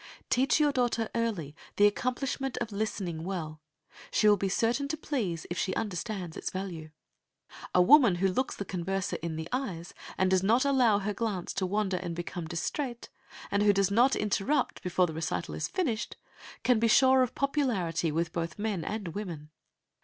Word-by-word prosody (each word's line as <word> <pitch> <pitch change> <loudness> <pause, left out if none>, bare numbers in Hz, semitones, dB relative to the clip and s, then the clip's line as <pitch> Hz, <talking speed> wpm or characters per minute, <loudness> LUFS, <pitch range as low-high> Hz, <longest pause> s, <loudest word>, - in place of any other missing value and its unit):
Teach 265 +4 +3
your 295 -1 +4
daughter 240 -4 0
early 200 -11 -2 0.2
the 205 - +5
accomplishment 255 +4 -1
of 230 -2 -3
listening 195 -6 -3
well. 160 -4 -5 0.5
She 215 - +3
will 210 - +7
be 195 0 -1
certain 235 +8 +1
to 315 +2 -3
please 215 - -2
if 175 - -2
she 190 - -1
understands 190 -4 -3
its - - -3
value. 180 -5 -5 0.9
A 180 - +7
woman 245 -4 +7
who 190 +2 +2
looks 255 +8 -1
the 200 - -5
converser 190 +1 -2
in 165 -1 -3
the 160 0 -5
eyes, 190 -10 -3 0.2
and 185 0 +2
does 190 -1 +4
not 230 +7 +3
allow 255 -7 +4
her 205 +1 -2
glance 200 -4 -3
to 190 -1 -1
wander 200 -1 0
and 175 -2 -4
become 175 -1 -5
distrait, 235 - -3 0.4
and 200 - +2
who 205 0 +5
does 195 -1 +2
not 245 +6 +4
interrupt 230 +7 0
before 180 0 +2
the 160 - -5
recital 160 +1 -3
is - - -2
finished, 245 - -2 0.5
can 250 -3 +4
be 230 - +3
sure 260 +3 +6
of 255 -1 0
popularity 210 - 0
with 165 +1 -1
both 165 -2 -3
men 205 -5 -2
and 205 -2 -4
women. 165 -5 -6
200 Hz, 180 wpm, -29 LUFS, 175-240 Hz, 0.9 s, will